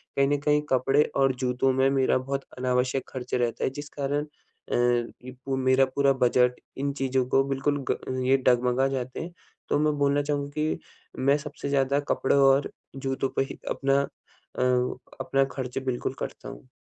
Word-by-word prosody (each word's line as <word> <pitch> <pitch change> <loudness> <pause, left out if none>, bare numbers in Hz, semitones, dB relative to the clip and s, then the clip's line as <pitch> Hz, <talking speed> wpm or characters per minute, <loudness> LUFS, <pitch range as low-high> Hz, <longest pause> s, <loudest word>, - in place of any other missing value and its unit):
कहीं 140 0 +3
न 145 +1 +2
कहीं 150 0 +3
कपड़े 135 +3 +3
और 135 -1 +3
जूतों 125 +1 +1
में 130 +1 +3
मेरा 135 -1 +2
बहुत 135 +1 -3
अनावश्यक 125 +1 0
खर्च 125 -2 -7
रहता 120 -2 0
है - - +2
जिस 145 +2 -8
कारण 145 +1 0 0.5
अ, - - +1
ये 120 +1 0
पू 135 -1 -1
मेरा 130 +1 +4
पूरा 140 -1 +4
बजट, 125 -1 +3 0.2
इन 140 +1 -1
चीज़ों 135 -2 0
को 135 - +4
बिल्कुल 140 +1 0
ग 130 0 -2
ये 135 +1 +4
डगमगा 125 +1 +3
जाते 130 -2 -4
हैं, 170 - -6 0.4
तो - - +2
मैं 150 0 +2
बोलना 140 0 +2
चाहूँगा 145 -1 -2
कि 155 0 -1 0.4
मैं 140 +2 +3
सबसे 145 -1 -6
ज़्यादा 140 0 +2
कपड़े 135 - +2
और 135 0 +4 0.2
जूतों 135 0 -2
पे - - +2
ही - - -9
अपना 135 0 +2
अ, 140 - -7 0.6
अपना 135 0 +2
खर्च 130 -2 -4
बिल्कुल 125 -2 -2
करता - - -6
हूँ। - - -12
135 Hz, 180 wpm, -26 LUFS, 130-140 Hz, 0.6 s, मेरा